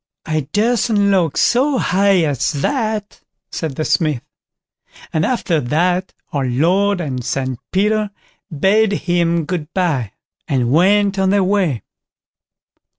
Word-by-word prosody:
"I 155 -4 -2
durstn't 215 -2 +2
look 175 -6 +1
so 265 +3 +2
high 195 -3 +2
as 145 +1 0
that", 215 - -2 0.3
said 155 -5 -4
the 155 - -2
Smith; 155 -7 0 0.9
and 155 - +1
after 185 -7 0
that 175 +8 0 0.2
our 140 -2 0
Lord 180 +10 +1
and 130 -7 -4
St 130 -1 -3
Peter 210 +2 +1 0.4
bade 200 +7 +2
him 170 -3 0
"good 165 -1 -4
bye", 150 - 0 0.3
and 125 -3 0
went 195 +5 +3
on 190 0 +2
their 200 0 +3
way. 185 - 0
180 Hz, 125 wpm, -18 LUFS, 150-205 Hz, 0.9 s, went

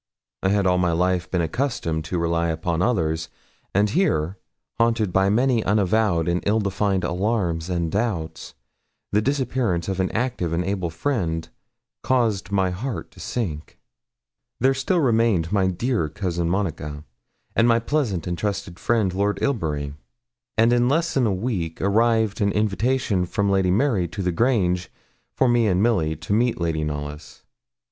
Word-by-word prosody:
I 95 - +1
had 100 0 +2
all 90 -1 +3
my 90 -2 +2
life 90 +1 0
been 90 - 0
accustomed 80 - -2
to 90 +3 -2
rely 85 0 0
upon 85 +1 -1
others, 80 -8 0 0.4
and 100 +2 +3
here, 95 - +1 0.4
haunted 115 -5 +2
by 95 0 +3
many 120 +1 +2
unavowed 100 -4 +2
and 85 +1 +1
ill 110 +2 +3
defined 100 -2 0
alarms 90 -2 -1
and 85 -3 -1
doubts, 100 -7 -3 0.6
the 105 - +3
disappearance 125 - 0
of 95 -1 -2
an 95 - +1
active 115 -8 -1
and 85 +1 0
able 95 -3 -1
friend 80 - -2 0.5
caused 110 -7 0
my 95 -2 +2
heart 115 +7 -5
to - - -17
sink. 80 -11 -4 1.0
Still 135 +7 0
there - - +3
remained 110 -9 +2
my 100 -2 +2
dear 100 -2 0
Cousin 85 -2 -2
Monica, 80 -6 -2 0.5
and 115 - +4
my 115 -1 +5
pleasant 115 - -1
and 90 - -2
trusted 100 -2 -3
friend, 110 -6 +1
Lord 100 +1 0
Ilbury; 75 - -1 0.6
and 115 +2 +4
in 120 0 +3
less 165 +4 +1
than 130 -4 +2
a - - +1
week 95 -5 -2
arrived 110 +1 +2
an 100 0 +3
invitation 105 -1 +1
from 100 +2 0
Lady 95 -2 +2
Mary 105 -2 +2
to 100 +4 -5
the 90 - +1
Grange, 90 -4 +1 0.5
for 130 - +3
me 120 -2 +3
and 95 0 +2
Milly, 85 -10 +2
to 80 +6 -4
meet 120 +1 +2
Lady 80 -2 -1
Knollys. 75 0 -6
95 Hz, 160 wpm, -23 LUFS, 85-115 Hz, 1.0 s, my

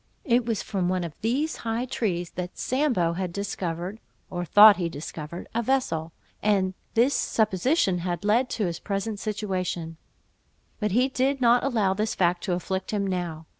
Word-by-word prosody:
It 240 -2 +2
was 225 -3 -1
from 185 -4 -1
one 185 -1 0
of 165 -3 -5
these 275 +8 0
high 230 +2 -2
trees 180 -8 -2
that 180 0 -6
Sambo 250 - +1
had 180 0 -3
discovered 185 0 -4 0.3
(or 175 -1 -2
thought 205 +4 +8
he 175 -2 -1
discovered) 155 +2 -7
a 235 - +1
vessel, 220 -11 0 0.3
and 195 -3 +2 0.2
this 245 +5 +4
supposition 215 - +1
had 175 +1 -3
led 235 +5 +3
to 215 - -1
his 170 -1 -3
present 205 +1 -3
situation; 185 -6 -3 0.8
but 210 -2 0
he 250 +4 +4
did 270 +1 0
not 240 -1 +4
allow 220 -8 +2
this 215 +3 -1
fact 175 -1 +1
to 185 - 0
afflict 190 +2 -3
him 205 -2 0
now. 175 -4 -3
195 Hz, 170 wpm, -26 LUFS, 175-230 Hz, 0.8 s, thought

